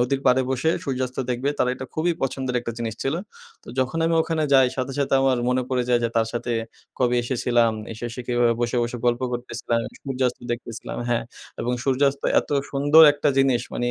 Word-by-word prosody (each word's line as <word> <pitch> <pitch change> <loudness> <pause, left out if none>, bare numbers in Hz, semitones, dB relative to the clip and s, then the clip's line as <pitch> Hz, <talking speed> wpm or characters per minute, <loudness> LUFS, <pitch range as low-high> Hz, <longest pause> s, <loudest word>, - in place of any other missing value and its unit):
নদীর 135 +2 +1
পাড়ে 130 +1 +5
বসে 130 +5 +1
সূর্যাস্ত 130 -1 -3
দেখবে 125 +3 -1
তারা 125 - +2
এটা 130 0 -7
খুবই 170 +2 +1
পছন্দের 130 -1 -2
একটা 120 0 -5
জিনিস 115 -2 -3
ছিল 145 +5 -1 0.4
তো - - -18
যখন 130 +5 0
আমি 165 - +1
ওখানে 160 -1 -1
যাই 130 -1 +6
সাথে, 130 +1 -2
সাথে 140 -1 +1
আমার 130 -2 +3
মনে 125 0 +1
পড়ে 125 -1 +1
যায় 120 -1 +3
যে - - +2
তার 115 -1 +3
সাথে 120 0 -2 0.5
কবে 125 -1 +2
এসেছিলাম 120 -2 +1 0.2
এসে, 110 +2 -8
এসে 125 +2 -6
কীভাবে 120 -1 +2
বসে, 120 +1 0
বসে 120 +1 -3
গল্প 120 +1 +2
করতেছিলাম 120 -1 -2 0.3
সূর্যাস্ত 130 -2 -1
দেখতেছিলাম 120 -1 -5
হ্যাঁ, 120 -1 0 0.4
এবং 125 - -1
সূর্যাস্ত 140 +1 +2 0.2
এত - - -14 0.2
সুন্দর 145 +3 +6
একটা 145 0 0
জিনিস 135 -3 +3
মানি 120 0 -1
125 Hz, 195 wpm, -23 LUFS, 120-135 Hz, 0.5 s, যাই